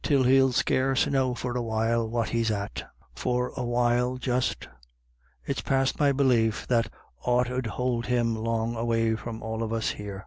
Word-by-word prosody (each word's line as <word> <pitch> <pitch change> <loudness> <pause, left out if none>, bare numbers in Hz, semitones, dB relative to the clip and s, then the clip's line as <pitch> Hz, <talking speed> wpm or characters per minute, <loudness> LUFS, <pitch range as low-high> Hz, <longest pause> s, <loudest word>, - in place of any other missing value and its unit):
l 140 -3 +4
he'll 130 +1 +5
scarce 130 +2 +2
know 130 -3 +1
for 125 +1 -4
a 125 - 0
while 115 0 0
what 115 -1 -1
he's 115 0 0
at; 100 -1 -4 0.2
for 125 0 -1
a - - -3
while 120 +1 +1
just 125 -1 -1 0.4
— - - -38
it's - - -2
past 135 0 0
my 145 -2 +4
belief 125 -5 +2
that 115 -2 +1 0.3
aught 125 0 +1
'ud 125 -1 -2
hould 120 +1 -2
him 120 -2 +1
long 115 +1 -1
away 115 -1 +1
from 110 +1 -7
all 110 0 -3
of 115 -1 -2
us 115 -1 0
here. 100 -2 -7
120 Hz, 180 wpm, -27 LUFS, 110-125 Hz, 0.4 s, he'll